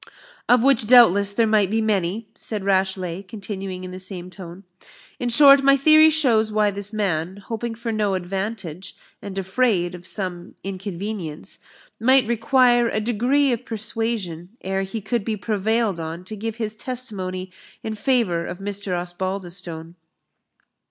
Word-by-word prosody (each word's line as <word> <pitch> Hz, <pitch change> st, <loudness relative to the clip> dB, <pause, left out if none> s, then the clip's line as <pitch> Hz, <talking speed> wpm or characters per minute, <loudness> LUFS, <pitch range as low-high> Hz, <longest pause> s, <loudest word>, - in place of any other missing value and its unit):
"Of 245 Hz, -1 st, +5 dB
which, 260 Hz, -5 st, +3 dB
doubtless, 205 Hz, -5 st, +6 dB
there 225 Hz, +3 st, +2 dB
might 215 Hz, -3 st, +3 dB
be 220 Hz, +2 st, 0 dB
many," 210 Hz, 0 st, -1 dB
said 210 Hz, -3 st, -4 dB
Rashleigh, 190 Hz, -2 st, 0 dB
continuing 195 Hz, -2 st, -7 dB
in 185 Hz, -, -7 dB
the 185 Hz, -, -7 dB
same 185 Hz, -1 st, -6 dB
tone 180 Hz, 0 st, -10 dB, 0.6 s
"In 245 Hz, -, -1 dB
short, 275 Hz, +3 st, +7 dB
my 275 Hz, 0 st, +5 dB
theory 310 Hz, +2 st, +7 dB
shows 240 Hz, -9 st, +3 dB
why 210 Hz, -1 st, +2 dB
this 200 Hz, +1 st, -2 dB
man, 190 Hz, -4 st, -2 dB
hoping 225 Hz, +3 st, -5 dB
for 230 Hz, 0 st, -4 dB
no 210 Hz, -3 st, 0 dB
advantage, 190 Hz, -1 st, -5 dB, 0.3 s
and 195 Hz, -1 st, -7 dB
afraid 190 Hz, -2 st, +1 dB
of 175 Hz, 0 st, -9 dB
some 180 Hz, -3 st, -4 dB
inconvenience, 190 Hz, -3 st, -6 dB, 0.4 s
might 260 Hz, +2 st, +4 dB
require 240 Hz, +1 st, +3 dB
a 215 Hz, -, -1 dB
degree 245 Hz, +6 st, +1 dB
of 235 Hz, +1 st, -4 dB
persuasion 215 Hz, -6 st, -3 dB
ere 195 Hz, +1 st, -2 dB
he 195 Hz, +3 st, -5 dB
could 235 Hz, +1 st, -2 dB
be 215 Hz, +1 st, -2 dB
prevailed 215 Hz, -1 st, 0 dB
on 165 Hz, +2 st, -6 dB
to 215 Hz, +4 st, -8 dB
give 220 Hz, +1 st, -4 dB
his 220 Hz, -2 st, -4 dB
testimony 190 Hz, -7 st, -4 dB, 0.3 s
in 220 Hz, -, -3 dB
favour 215 Hz, -7 st, +1 dB
of 175 Hz, -, -6 dB
Mr. 195 Hz, -2 st, -2 dB
Osbaldistone." 175 Hz, -2 st, -5 dB
205 Hz, 150 wpm, -22 LUFS, 185-230 Hz, 0.6 s, short